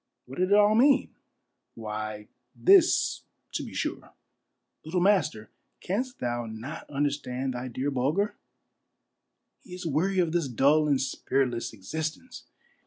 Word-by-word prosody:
What 130 +5 -9
did 185 +1 +2
it 200 - +5
all 210 0 +5
mean? 265 +5 +4 0.6
Why, 110 -1 -5 0.3
this, 375 -2 +4 0.3
to - - -2
be - - -8
sure: - - -4 0.3
— - - -53
" - - -55
Little 165 +4 -1
master, 155 - +1 0.3
canst 250 +7 -3
thou 120 -1 -3
not 115 +8 -8
understand 140 -2 -2
thy 125 +1 -5
dear 130 +4 -2
Bulger? 150 - 0 1.3
He 180 - -11
is 180 - -8
weary 170 +6 0
of 175 -3 +2
this 170 -3 0
dull 140 +5 +3
and 140 -2 +2
spiritless 130 -2 -1
existence. 160 - -6
145 Hz, 140 wpm, -27 LUFS, 125-185 Hz, 1.3 s, it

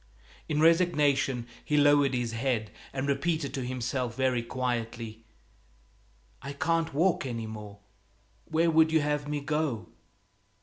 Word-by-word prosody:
In 150 -1 0
resignation 150 -7 +3 0.2
he 150 - 0
lowered 145 -2 +5
his 120 -2 -1
head 115 -3 -1 0.2
and 135 +1 -3
repeated 140 +1 0
to 135 -2 -3
himself 125 -1 -2
very 130 -2 +1
quietly, 115 -2 -3 1.2
"I 140 +1 -6
can't 165 +3 0
walk 175 +4 +2
any 115 -2 -4
more; 105 -2 -8 0.7
where 165 +1 +2
would 160 0 +5
you 160 -1 +4
have 150 0 -1
me 145 0 -2
go?" 145 -6 -2
135 Hz, 130 wpm, -29 LUFS, 120-150 Hz, 1.2 s, lowered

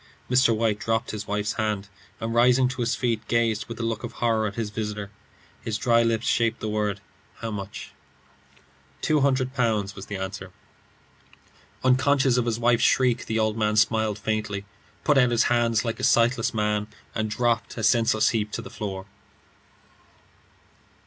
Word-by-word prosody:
Mr. 125 -2 +4
White 110 -2 0
dropped 115 +2 -1
his 105 -1 -6
wife's 105 +1 -1
hand, 105 -2 -2 0.3
and 115 0 -3
rising 125 +2 +4
to 130 0 -4
his 115 0 +1
feet, 115 -3 -1
gazed 115 -2 +1
with 115 0 -8
a - - -2
look 115 -1 -3
of 120 -1 -6
horror 110 -2 +1
at 100 - -6
his 110 -3 -3
visitor. 105 -2 -4 0.5
His 110 -2 -3
dry 115 +1 +3
lips 115 -1 0
shaped 115 -1 +1
the 110 - -4
words, 105 -1 -1 0.4
"How 115 -1 -5
much?" 100 -1 -7 1.1
"Two 155 -1 +2
hundred 130 -2 +1
pounds," 110 -6 0
was 95 0 -9
the 105 - -5
answer. 95 -1 -6 1.3
Unconscious 130 0 +3
of 120 -1 +1
his 115 -1 0
wife's 120 0 +2
shriek, 125 -3 +2
the 110 - -1
old 110 0 +1
man 105 0 +1
smiled 110 0 +2
faintly, 105 -2 -3 0.4
put 145 -3 +4
out 125 -2 +4
his 120 -1 +3
hands 115 -1 +2
like 115 - -3
a - - -6
sightless 120 0 +3
man, 105 -1 0 0.3
and 110 0 -2
dropped, 120 +1 -1
a 115 - -3
senseless 110 0 +3
heap, 105 -2 -1
to - - -4
the - - -10
floor. 95 -2 -5
115 Hz, 170 wpm, -25 LUFS, 105-120 Hz, 1.3 s, Mr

